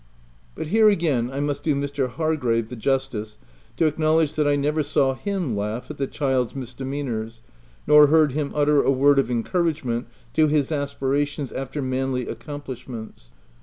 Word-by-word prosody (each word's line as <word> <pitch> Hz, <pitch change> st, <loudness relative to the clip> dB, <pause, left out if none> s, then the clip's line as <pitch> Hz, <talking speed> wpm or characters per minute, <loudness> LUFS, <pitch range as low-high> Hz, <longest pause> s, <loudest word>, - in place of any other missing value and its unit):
But 155 Hz, -, -5 dB
here 220 Hz, +3 st, +5 dB
again, 150 Hz, -, +1 dB
I 135 Hz, -, -4 dB
must 145 Hz, 0 st, -2 dB
do 150 Hz, -1 st, +1 dB
Mr. 140 Hz, -2 st, -1 dB
Hargrave 125 Hz, -7 st, 0 dB
the 125 Hz, -, -6 dB
justice 120 Hz, -4 st, -2 dB, 0.4 s
to 165 Hz, -, +3 dB
acknowledge 155 Hz, 0 st, +2 dB
that 150 Hz, -1 st, +1 dB
I 145 Hz, -, +3 dB
never 150 Hz, +2 st, 0 dB
saw 140 Hz, -2 st, +1 dB
him 180 Hz, -, -2 dB
laugh 105 Hz, +4 st, -3 dB
at -, -, -10 dB
the 135 Hz, -, 0 dB
child's 130 Hz, -5 st, -1 dB
misdemeanours, 125 Hz, -3 st, -5 dB, 0.4 s
nor 150 Hz, 0 st, +7 dB
heard 155 Hz, -1 st, +4 dB
him 145 Hz, +1 st, -2 dB
utter 145 Hz, -1 st, +4 dB
a -, -, +1 dB
word 140 Hz, +1 st, +4 dB
of 135 Hz, -, +1 dB
encouragement 130 Hz, -2 st, -1 dB, 0.3 s
to 155 Hz, -1 st, +4 dB
his 150 Hz, -1 st, +1 dB
aspi 140 Hz, -2 st, -3 dB, 0.2 s
rations 145 Hz, -2 st, -3 dB
after 135 Hz, +2 st, -4 dB
manly 130 Hz, -1 st, -1 dB
accomplishments. 125 Hz, -, -8 dB
140 Hz, 165 wpm, -23 LUFS, 125-150 Hz, 0.4 s, nor